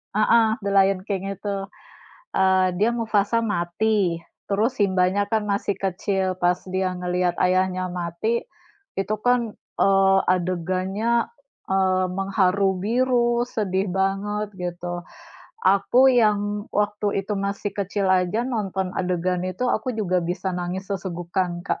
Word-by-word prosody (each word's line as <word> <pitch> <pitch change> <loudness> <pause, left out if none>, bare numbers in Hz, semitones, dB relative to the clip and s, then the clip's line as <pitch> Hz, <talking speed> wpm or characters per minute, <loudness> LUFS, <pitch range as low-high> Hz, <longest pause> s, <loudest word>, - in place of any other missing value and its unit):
heeh, 220 +1 +4 0.2
The 200 - -1
Lion 195 -1 +4
King 195 -1 -3
itu, 195 0 -4 0.7
eee, 190 -1 +4
dia 210 +5 +3
Mufasa 225 -1 +1
mati, 195 -2 0 0.3
terus 225 +6 +1
Simba-nya 190 0 +2
kan 220 -1 +2
masih 200 0 0
kecil, 190 0 -1
pas 175 0 +2
dia 185 0 0
ngelihat 180 0 -1
ayahnya 185 0 +1
mati 175 +6 -2 0.6
itu 210 +2 0
kan, 245 -3 +2 0.2
eee, 195 0 +4
adegannya, 185 +6 0 0.4
eee, 190 -1 +2
mengharu 195 0 +1
biru 240 +1 +2
sedih 195 -3 -1
banget 195 +2 -1
gitu. 175 -1 -4 0.6
Aku 200 +7 +4
yang 210 -3 +1
waktu 205 -1 0
itu 210 - -1
masih 200 +1 -2
kecil 200 0 -1
aja 185 +4 +2
nonton 195 -6 -2
adegan 180 0 -1
itu 185 +7 -3
aku 220 +4 -1
juga 185 -4 +1
bisa 180 +2 -2
nangis 180 +2 -4
sesegukan, 175 -1 -2
Kak. - - -1
195 Hz, 125 wpm, -23 LUFS, 185-210 Hz, 0.7 s, heeh